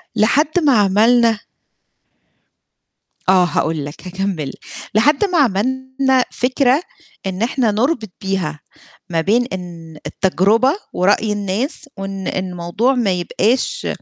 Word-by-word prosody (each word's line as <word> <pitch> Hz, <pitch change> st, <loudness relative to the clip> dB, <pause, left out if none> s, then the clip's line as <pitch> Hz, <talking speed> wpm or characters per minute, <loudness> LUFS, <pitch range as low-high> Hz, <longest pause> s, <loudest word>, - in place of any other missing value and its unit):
لحد 290 Hz, +10 st, +2 dB
ما 255 Hz, -7 st, +5 dB
عملنا 225 Hz, +3 st, +3 dB, 1.9 s
آه، 185 Hz, -1 st, +6 dB
هاقول 160 Hz, -3 st, -1 dB
لك 145 Hz, +5 st, -9 dB
هاكمّل 185 Hz, -6 st, -3 dB
ل -, -, -8 dB, 0.4 s
لحد 290 Hz, -, +4 dB
ما 360 Hz, -4 st, 0 dB
عملنا 260 Hz, +2 st, +1 dB
فكرة 260 Hz, +3 st, +2 dB, 0.4 s
إن 190 Hz, +1 st, -3 dB
إحنا 240 Hz, -2 st, +1 dB
نربط 225 Hz, -, 0 dB
بيها 185 Hz, -6 st, -2 dB, 0.5 s
ما 165 Hz, -1 st, 0 dB
بين 230 Hz, +8 st, +2 dB
إن 170 Hz, -3 st, -8 dB
التجربة 205 Hz, +7 st, +2 dB, 0.2 s
ورأي 205 Hz, +3 st, +2 dB
الناس 210 Hz, -, -3 dB
وإن 195 Hz, -1 st, -5 dB
الموضوع 185 Hz, +7 st, -1 dB
ما 230 Hz, -6 st, +1 dB
يبقاش 225 Hz, -, 0 dB
210 Hz, 110 wpm, -18 LUFS, 185-255 Hz, 1.9 s, آه